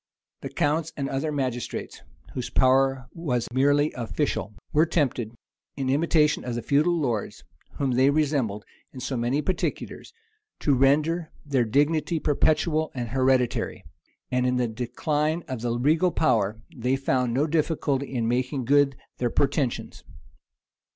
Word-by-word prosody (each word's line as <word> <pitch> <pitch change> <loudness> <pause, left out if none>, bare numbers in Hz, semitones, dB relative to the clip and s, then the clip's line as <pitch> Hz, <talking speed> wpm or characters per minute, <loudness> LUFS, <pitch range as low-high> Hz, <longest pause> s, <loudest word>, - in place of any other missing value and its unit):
The - - -5
counts 155 +2 0
and 140 -2 -2
other 135 +3 -2
magistrates, 130 -5 -3 0.3
whose 125 - -4
power 135 0 +3
was 130 -9 -2
merely 145 +3 +3
official, 120 -3 -2 0.2
were 155 +2 +4
tempted, 125 -8 -1 0.4
in 130 -1 0
imitation 150 +1 +2
of 120 -1 -3
the 120 - -3
feudal 155 +5 +2
lords, 120 -9 -2 0.3
whom 135 -2 -1
they 130 +2 +4
resembled 140 -9 0 0.3
in 130 - -9
so 130 +1 -3
many 125 +5 0
particulars, 185 - -3 0.5
to 145 - +3
render 150 +5 +2 0.2
their 135 -4 +1
dignity 150 +7 +1
perpetual 155 +2 +1
and 120 -2 -3
hereditary; 130 0 +1 0.5
and 125 0 +1
in 125 - +1
the 125 -1 +1
decline 150 +8 -1
of 130 -5 -5
the 120 0 -1
regal 155 +8 +3
power, 110 -10 +1 0.2
they 125 +1 0
found 130 -2 0
no 135 +5 +2
difficulty 150 -3 0
in 120 -4 -1
making 125 +2 -1
good 140 +1 +4 0.2
their 120 - +1
pretentions. 140 -1 -1
135 Hz, 140 wpm, -25 LUFS, 125-150 Hz, 0.5 s, were